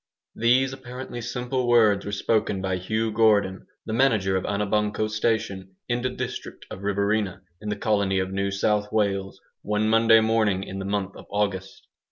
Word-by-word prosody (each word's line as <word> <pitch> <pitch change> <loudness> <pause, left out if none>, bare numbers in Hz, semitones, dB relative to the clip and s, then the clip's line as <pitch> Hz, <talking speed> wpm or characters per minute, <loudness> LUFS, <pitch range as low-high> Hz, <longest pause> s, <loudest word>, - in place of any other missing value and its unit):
These 130 +3 +2
apparently 125 -1 -7
simple 125 +1 -2
words 110 -5 +4
were - - -3
spoken 100 -1 0
by 95 -1 -1
Hugh 110 +5 -1
Gordon, 105 -3 +2 0.2
the 110 - -4
manager 110 -6 +2
of 95 - -1
Anabanco 105 +1 0
station, 105 -3 -2
in 120 0 -1
the 130 - 0
district 125 - -6
of 95 - -7
Riverina, 100 -1 -1 0.2
in 105 - -5
the 105 - -1
colony 100 -2 +1
of 95 0 -1
New 100 0 -1
South 105 +1 0
Wales, 100 -3 -1 0.2
one 105 +1 0
Monday 115 0 +6
morning 110 -4 +1
in 95 0 -6
the 95 - -4
month 100 -1 -2
of - - -12
August. 100 -2 -2
105 Hz, 170 wpm, -25 LUFS, 100-115 Hz, 0.2 s, Monday